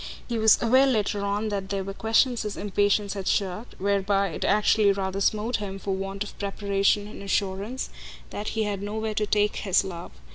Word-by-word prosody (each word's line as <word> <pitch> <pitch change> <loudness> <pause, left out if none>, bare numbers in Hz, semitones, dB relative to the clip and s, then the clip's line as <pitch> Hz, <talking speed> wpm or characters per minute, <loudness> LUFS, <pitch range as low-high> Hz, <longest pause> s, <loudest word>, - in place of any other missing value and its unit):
He 235 -2 -2
was 220 -1 +6
aware 260 +4 +5
later 210 -5 0
on 205 +2 -1
that 195 -2 -3
there 195 -1 -2
were 195 +1 -5
questions 225 +4 +2
his 210 -2 -4
impatience 205 0 +1
had 195 -2 -5
shirked; 195 +4 -1
whereby 200 0 +1
it 165 - -5
actually 210 0 +4
rather 195 0 -2
smote 215 +4 +1
him, 195 -2 -5
for 195 0 -3
want 195 +1 -3
of 205 - -10
preparation 200 0 +1
and 210 - -9
assurance, 200 +5 -2 0.4
that 210 +1 -5
he 220 - +2
had 205 -2 -2
nowhere 215 +2 -3
to 210 0 -1
"take" 210 0 +1
his 190 -1 +2
love. 175 -3 -7
205 Hz, 190 wpm, -26 LUFS, 195-215 Hz, 0.4 s, was